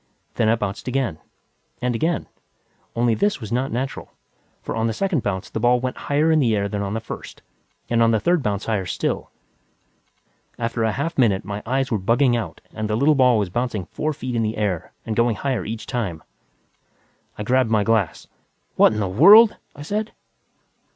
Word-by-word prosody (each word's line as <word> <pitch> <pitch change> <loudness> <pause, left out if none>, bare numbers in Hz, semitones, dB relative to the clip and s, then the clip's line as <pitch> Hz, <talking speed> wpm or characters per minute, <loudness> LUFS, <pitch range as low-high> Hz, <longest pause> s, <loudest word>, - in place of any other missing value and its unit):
Then 110 -2 +1
it 115 - +3
bounced 105 +1 -4
again. 125 -11 -1 0.6
And 125 0 -1
again. 160 +7 -1 0.7
Only 120 0 +2
this 205 - 0
was 110 -3 -8
not 130 +3 -1
natural, 130 +3 -4 0.5
for - - -4
on 115 0 0
the 110 - -1
second 190 - 0
bounce 95 -3 -3
the - - -4
ball 120 +2 +3
went 130 0 -3
higher 150 +3 +1
in 160 - +4
the 115 -6 +2
air 100 -1 0
than 100 0 -3
on 100 +1 -3
the - - -1
first, 115 - -9 0.4
and 115 -1 +1
on 115 - +5
the 110 -1 +2
third 175 +9 +2
bounce 105 -6 -2
higher 100 -5 -1
still. 90 - -2 1.3
After 115 0 -2
a 110 - +2
half 160 +6 -3
minute, 100 -7 +2
my 100 +1 -5
eyes 135 +1 0
were 110 - +1
bugging 120 +6 +2
out 115 - -4
and 110 -1 -3
the 105 - 0
little 145 +5 +4
ball 130 -4 +4
was 100 -4 -1
bouncing 120 -4 -2
four 155 - -3
feet 130 -4 -5
in 115 - +1
the 110 0 -2
air 100 -6 -2
and 110 - -3
going 115 -1 +2
higher 130 +3 -2
each 110 +1 -5
time. 95 - -3 1.1
I 105 - -4
grabbed 130 +1 +2
my 110 -2 +2
glass. 110 -5 0 0.5
"What - - +6
the 105 -2 -1
hell!" 200 - +8 0.3
I 145 - -9
said. 210 +7 -3
115 Hz, 195 wpm, -22 LUFS, 105-135 Hz, 1.3 s, hell